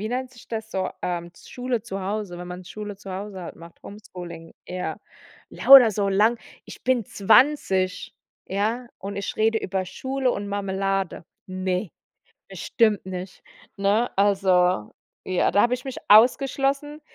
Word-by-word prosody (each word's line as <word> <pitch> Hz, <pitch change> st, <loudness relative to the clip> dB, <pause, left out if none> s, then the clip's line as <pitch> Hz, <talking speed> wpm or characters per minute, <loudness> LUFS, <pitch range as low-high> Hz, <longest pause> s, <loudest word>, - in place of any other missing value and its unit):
wie 215 Hz, -, -3 dB
nennt 255 Hz, +1 st, -3 dB
sich 240 Hz, -, -16 dB
das 220 Hz, -1 st, -5 dB
so, 190 Hz, -1 st, -1 dB
ähm, 175 Hz, -1 st, -3 dB
z -, -, -17 dB
Schule 245 Hz, -3 st, -3 dB
zu 195 Hz, -4 st, -5 dB
Hause, 195 Hz, -2 st, -4 dB
wenn 180 Hz, 0 st, -8 dB
man 180 Hz, +1 st, -8 dB
Schule 210 Hz, +1 st, -7 dB
zu 195 Hz, -1 st, -10 dB
Hause 190 Hz, -2 st, -6 dB
macht, 170 Hz, 0 st, -15 dB
Homeschooling, 175 Hz, -5 st, -10 dB
ja. 180 Hz, 0 st, -4 dB, 0.5 s
Lauter 265 Hz, -5 st, +8 dB
so 200 Hz, -1 st, -1 dB
lang 215 Hz, +4 st, +3 dB, 0.3 s
ich -, -, -12 dB
bin 250 Hz, -4 st, +1 dB
20, 200 Hz, -4 st, +2 dB, 0.3 s
ja, 220 Hz, +6 st, -2 dB
und 200 Hz, +1 st, -6 dB
ich 200 Hz, -, -4 dB
rede 220 Hz, +1 st, +2 dB
über 190 Hz, -2 st, -2 dB
Schule 265 Hz, +6 st, -2 dB
und 205 Hz, -3 st, -4 dB
Marmelade. 195 Hz, -2 st, -2 dB, 0.2 s
Ne, 185 Hz, 0 st, -2 dB, 0.6 s
bestimmt 215 Hz, -5 st, +1 dB
nicht, 185 Hz, 0 st, -7 dB, 0.3 s
ne? 205 Hz, +4 st, +1 dB
Also, 185 Hz, -, +2 dB, 0.3 s
ja, 185 Hz, -1 st, +1 dB
da 205 Hz, -, +4 dB
hab 240 Hz, -, +3 dB
ich 250 Hz, -, -3 dB
mich 265 Hz, -, -6 dB
ausgeschlossen 275 Hz, +6 st, +3 dB
200 Hz, 150 wpm, -24 LUFS, 185-235 Hz, 0.6 s, Lauter